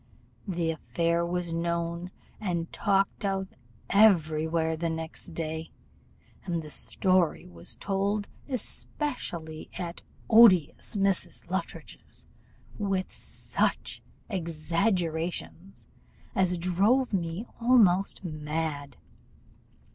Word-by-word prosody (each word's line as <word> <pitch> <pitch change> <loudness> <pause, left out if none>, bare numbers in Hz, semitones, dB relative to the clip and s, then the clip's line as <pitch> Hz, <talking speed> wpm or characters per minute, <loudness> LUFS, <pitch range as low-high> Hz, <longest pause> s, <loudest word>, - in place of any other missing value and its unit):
The 170 -3 0
affair 170 +1 0
was 175 -1 -2
known 170 +1 -2 0.3
and 170 -5 -2
talked 195 -1 +1
of 195 -1 -1 0.4
every 160 -7 +5
where 160 0 +1
the 165 +1 -1
next 160 +1 -5
day, 160 0 -3 0.7
and 170 -3 -2
the 150 - -9
story 185 0 +1
was 85 -1 -5
told 200 +1 -1 0.2
especially 200 - -4
at 170 -1 -5 0.3
odious 220 -7 +6
Mrs. 195 -1 0
Luttridge's, - - -5 0.5
with 195 -2 -1
such - - -1 0.3
exaggerations 170 0 -2 0.5
as 180 -2 +2
drove 200 +9 +2
me 175 +3 -1
almost 205 -7 +4
mad. 150 -3 -3
175 Hz, 90 wpm, -28 LUFS, 165-195 Hz, 0.7 s, odious